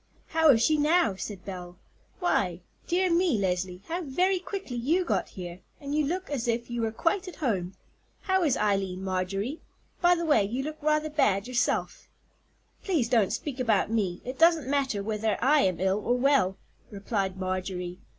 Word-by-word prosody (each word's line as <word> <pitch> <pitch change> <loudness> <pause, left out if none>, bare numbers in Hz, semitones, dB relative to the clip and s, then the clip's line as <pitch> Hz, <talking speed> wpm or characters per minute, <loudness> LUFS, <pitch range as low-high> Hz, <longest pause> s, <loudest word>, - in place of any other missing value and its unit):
"How 320 -1 +4
is 230 -5 +6
she 310 -1 +3
now?" 315 - +3
said 195 -1 -7
Belle. 180 -2 -7 0.4
"Why, 185 - 0 0.3
dear 365 +1 +2
me, 340 -7 +3
Leslie, 180 -1 -2
how 345 +2 -2
very 360 +6 +1
quickly 380 -8 -6
you 315 +10 +1
got 210 - -1
here, 175 -1 -8 0.2
and 280 -1 -5
you 305 0 +2
look 365 +4 -3
as 250 -5 -2
if 235 +1 -1
you 240 -1 -2
were 225 -1 0
quite 360 - 0
at 360 - -8
home. 190 - -2 0.5
How 380 -1 +1
is 300 -7 +2
Eileen, 195 -3 0
Marjorie? 195 - -2 0.4
By 355 -1 +5
the 340 -1 -2
way, 290 -10 +4
you 240 +7 -2
look 310 +2 -6
rather 305 +1 +1
bad 220 -9 +2
yourself." 250 0 -1 0.7
"Please 315 - 0
don't 225 -6 +3
speak 275 -3 -4
about 220 -4 +2
me; 195 -6 -1
it 255 +2 -6
doesn't 330 -4 +4
matter 270 -7 0
whether 215 0 -1
I 290 +3 +4
am 185 - +1
ill 190 +2 +1
or 245 +1 +1
well," 255 -8 +2 0.3
replied 195 -2 -2
Marjorie. 185 -1 -3
240 Hz, 180 wpm, -27 LUFS, 195-310 Hz, 0.7 s, is